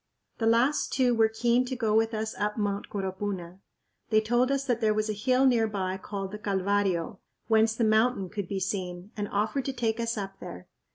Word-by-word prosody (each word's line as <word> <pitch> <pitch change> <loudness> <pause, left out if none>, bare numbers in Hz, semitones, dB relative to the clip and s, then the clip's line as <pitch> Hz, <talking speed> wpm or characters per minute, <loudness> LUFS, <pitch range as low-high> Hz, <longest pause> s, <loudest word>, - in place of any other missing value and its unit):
The 225 - +1
last 240 +6 +2
two 255 -2 +3
were 225 -1 +4
keen 235 +2 +2
to 255 +1 -4
go 225 -4 0
with 225 +1 +2
us 220 0 -3
up 210 +1 -1
Mt. 205 -1 -2
Coropuna. 190 -2 -4 0.5
They 215 - +5
told 240 +4 +1
us 275 0 0
that 245 -3 0
there 215 -1 +2
was 215 0 0
a - - -2
hill 255 +5 +2
near 235 -4 +4
by 190 -3 -2
called 195 0 -5
the 210 - -7
Calvario, 195 -2 0 0.3
whence 220 0 +3
the 230 - 0
mountain 220 -1 +2
could 200 0 -5
be 195 +1 -2
seen, 185 0 -4
and 205 -2 -3
offered 215 +7 -1
to 270 - -2
take 230 -2 -1
us 230 0 -1
up 195 -1 -5
there. 90 0 -9
215 Hz, 210 wpm, -28 LUFS, 200-235 Hz, 0.5 s, They